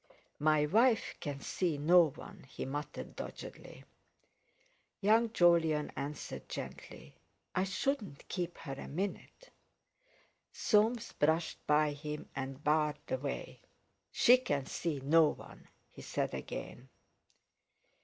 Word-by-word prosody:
"My 155 0 +4
wife 225 +7 +3
can 140 -2 -5
see 170 -1 -1
no 165 +3 +6
one," 170 +3 -12
he - - -5
muttered 145 +3 -5
doggedly. - - -8 1.2
Young 220 +2 +4
Jolyon 165 -6 +3
answered 145 +2 -6
gently: - - -8 0.3
"I 185 - +1
shouldn't 205 - -2
keep 175 -2 -3
her 135 - -6
a 135 - -7
minute." 200 - -5 1.0
Soames 225 +2 +2
brushed 160 +2 +1
by 150 0 +4
him 150 +1 -6
and 135 +1 -5
barred 150 -1 +2
the 130 - -2
way. 140 0 -5 0.5
"She 250 +2 +6
can 145 - -2
see 150 -1 -3
no 160 +4 +5
one," - - -8 0.2
he - - -12
said - - -2
again. 130 +2 -6
155 Hz, 115 wpm, -33 LUFS, 145-195 Hz, 1.2 s, no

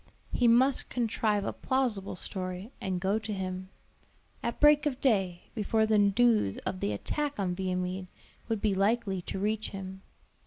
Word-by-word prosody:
He 245 - +3
must 255 +4 +4
contrive 215 -3 0
a - - -2
plausible 245 -9 -1
story, 185 +3 -4
and 185 -1 -1
go 195 +4 +1
to 220 0 -6
him; 185 -1 -4 0.7
at 235 - -3
break 295 0 +6
of 265 -3 -2
day, 195 -9 0
before 220 0 +1
the 215 -1 +3
news 205 - +3
of 185 - -2
the 105 - -1
attack 290 - -3
on 185 -2 0
Viamede 185 0 -2 0.4
would 220 -3 -1
be 210 -2 +2
likely 195 -1 +1
to 175 - -5
reach 215 +2 -1
him. 190 -1 -7
205 Hz, 160 wpm, -30 LUFS, 185-230 Hz, 0.7 s, break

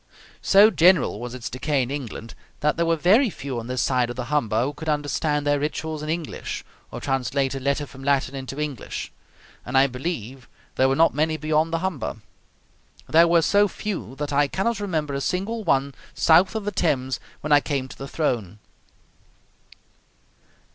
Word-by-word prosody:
So 205 +3 +6
general 170 - +4
was 120 +1 -6
its 125 - -6
decay 135 +2 0
in 125 - -5
England 120 -5 -6 0.3
that 150 0 +2
there 170 0 0
were 165 - +3
very 205 - +4
few 135 -9 -5
on 115 - -7
this 125 0 -1
side 125 -2 +1
of 120 - -5
the 125 -1 -5
Humber 115 -6 +1
who 140 +3 -2
could 155 +2 -6
understand 150 0 0
their 145 0 +2
rituals 155 +1 -3
in 155 - -5
English, 165 -1 -4 0.2
or - - -7
translate 135 0 -1
a 135 - -4
letter 140 +2 0
from 135 -1 -13
Latin 140 -1 +1
into 135 +1 -6
English; 150 -6 -4 0.5
and 130 +2 -1
I 135 - +6
believe 130 -2 -5 0.2
there 130 0 +3
were 135 - +2
not 165 +3 +4
many 155 +2 0
beyond 155 +1 +1
the 165 +2 -1
Humber. 165 -10 -4 0.9
There 165 +2 +5
were 170 -1 +4
so 205 +4 +4
few 195 - -5
that 145 0 -4
I 145 +1 +3
cannot 200 +8 -1
remember 160 -8 -2
a 140 - -2
single 200 +8 -2
one 135 -5 +1 0.2
south 175 +6 +4
of 220 -2 -3
the 205 - -1
Thames 130 -8 0 0.2
when 150 - -4
I 145 - +7
came 140 -3 -2
to - - -11
the 135 - -7
throne. 115 - -2
145 Hz, 185 wpm, -24 LUFS, 130-165 Hz, 0.9 s, I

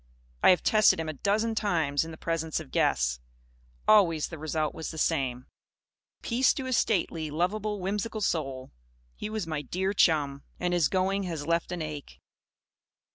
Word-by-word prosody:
I - - +6
have 180 - +4
tested 215 -5 +4
him 160 -1 -3
a - - -3
dozen 215 +9 0
times, 165 -10 +1
in 165 - -7
the 160 - -9
presence 165 -1 -2
of 65 - -10
guests. - - +1 0.7
Always 175 -8 +4
the 160 - -8
result 155 0 -1
was 160 - -5
the 160 - -8
same. 130 -6 0 0.8
Peace 245 +1 +2
to 265 - -4
his 255 -1 0
stately, 170 -8 0
lovable, 205 +7 -1
whimsical 210 +4 -3
soul! 135 -8 -2 0.4
He 210 - -5
was 215 -3 -3
my 155 -2 -3
dear 190 +8 -2
chum. 145 -7 +2 0.2
And 180 0 0
his 170 -4 +3
going 190 +1 +1
has 160 -5 -4
left 170 +2 0
an 175 -2 -3
ache. 150 -2 -8
165 Hz, 170 wpm, -28 LUFS, 155-200 Hz, 0.8 s, I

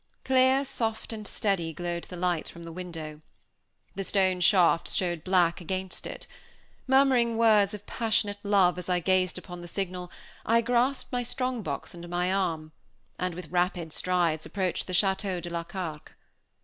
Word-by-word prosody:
Clear, 260 +1 +4
soft, 225 -3 -3
and 215 -2 -6
steady, 185 -7 -1
glowed 175 +1 -4
the 180 - -9
light 175 -2 0
from 170 - -11
the 165 - -7
window. 160 -3 -7 0.7
The 195 - -3
stone 190 -2 +2
shafts 175 -3 +4
showed 175 -4 -1
black 180 -2 +2
against 185 +1 -4
it. - - -8 0.6
Murmuring 260 -4 +4
words 215 -3 +4
of 205 0 -11
passionate 210 -3 0
love 195 -3 +3
as 180 - -7
I 180 -1 +2
gazed 185 +1 +1
upon 180 -1 -8
the 175 - -8
signal, 180 -1 -4 0.3
I 230 +1 +3
grasped 245 +3 +1
my 245 - 0
strong 250 0 -2
box 145 -7 -4
under 175 0 -9
my 175 +2 0
arm, 165 -5 -1 0.5
and 180 -2 -2
with 180 0 -9
rapid 175 -2 0
strides 170 -4 +1
approached 190 -3 -2
the 185 - -5
Château 190 0 +1
de 175 0 -7
la 170 0 -2
Carque. 165 -4 -6
185 Hz, 165 wpm, -28 LUFS, 175-210 Hz, 0.7 s, Clear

